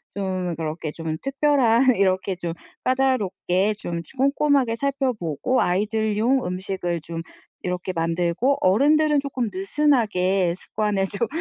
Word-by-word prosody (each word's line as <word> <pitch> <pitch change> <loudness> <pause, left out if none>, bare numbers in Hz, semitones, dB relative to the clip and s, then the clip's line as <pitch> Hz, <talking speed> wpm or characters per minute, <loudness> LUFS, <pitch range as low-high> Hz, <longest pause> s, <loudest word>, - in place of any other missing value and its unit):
좀 185 -3 -2
그렇게 155 -1 -4
좀 165 -1 -4
특별한 270 -3 +3
이렇게 190 0 +1
좀 170 -2 -4 0.3
까다롭게 215 -6 +1
좀 170 -5 -4 0.2
꼼꼼하게 275 -2 +2
살펴 275 -1 0
보고 180 - -1
아이들용 220 +6 +1
음식을 180 -2 -3
좀 165 +1 -6 0.4
이렇게 180 0 -3
만들고 170 +10 0
어른들은 295 +9 +4
쪼끔 260 -5 -3
느슨하게 195 - +1
습관을 205 0 -1
좀 215 +4 -2
200 Hz, 280 characters per minute, -23 LUFS, 180-260 Hz, 0.4 s, 어른들은